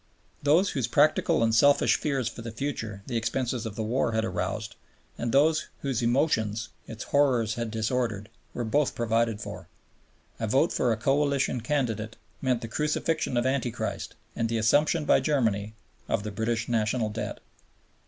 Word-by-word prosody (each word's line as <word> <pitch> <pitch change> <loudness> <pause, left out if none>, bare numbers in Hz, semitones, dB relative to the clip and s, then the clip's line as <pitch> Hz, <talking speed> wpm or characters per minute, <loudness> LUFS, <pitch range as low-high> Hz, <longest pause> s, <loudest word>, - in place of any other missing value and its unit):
Those 165 +7 +3
whose 130 -6 -1
practical 145 -1 +3
and 115 0 +2
selfish 140 +5 +5
fears 135 -5 -1
for 120 - -6
the 115 0 -6
future 110 -5 -4
the 125 - -5
expenses 120 0 -1
of 105 - -7
the 110 - -2
war 115 +1 0
had 110 0 +1
aroused, 95 +3 -3 0.4
and 120 - -2
those 155 +4 +3
whose 135 -3 -1
emotions 115 -4 +1 0.2
its 110 -1 -7
horrors 125 -6 +2
had 115 -1 -3
disordered, 110 -2 -1 0.3
were 120 - -2
both 140 +5 +1
provided 115 -1 +1
for. - - -8 0.7
A - - -1
vote - - +2
for 125 - +1
a 110 - +1
Coalition 135 0 +1
candidate 115 -4 -1 0.3
meant 130 -3 +1
the - - -3
Crucifixion 150 +1 -1
of 120 - +1
Anti 130 -1 +1
Christ 115 - -4 0.2
and 115 - -1
the 115 - 0
assumption 150 +8 +3
by - - +5
Germany 110 -8 0 0.3
of 105 - 0
the 105 - -4
British 115 +3 -1
National 110 -1 0
Debt. 110 - -4
115 Hz, 165 wpm, -27 LUFS, 110-135 Hz, 0.7 s, selfish